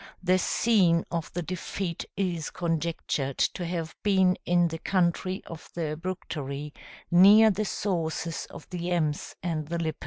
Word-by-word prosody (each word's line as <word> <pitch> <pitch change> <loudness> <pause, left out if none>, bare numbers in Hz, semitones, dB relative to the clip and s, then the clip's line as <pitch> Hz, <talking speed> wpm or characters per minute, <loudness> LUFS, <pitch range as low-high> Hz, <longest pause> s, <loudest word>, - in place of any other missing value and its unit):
The 185 0 +3
scene 185 -7 +3
of 165 -1 -3
the 175 - -2
defeat 180 +1 -4
is 175 -5 -1
conjectured 165 -5 -2
to 175 - 0
have 165 -2 -3
been 190 -3 +4
in 175 -1 +4
the 165 0 -5
country 185 +1 0
of 165 -2 -10
the 155 -3 -2
Bructeri, 150 -5 -5 0.4
near 205 +5 +8
the 210 +2 -1
sources 165 -5 -2
of 165 - -11
the 175 -1 -3
Ems 155 -4 -1
and 160 -4 -2
the 170 +2 -2
Lippe. 160 -2 -2
170 Hz, 150 wpm, -27 LUFS, 160-185 Hz, 0.4 s, near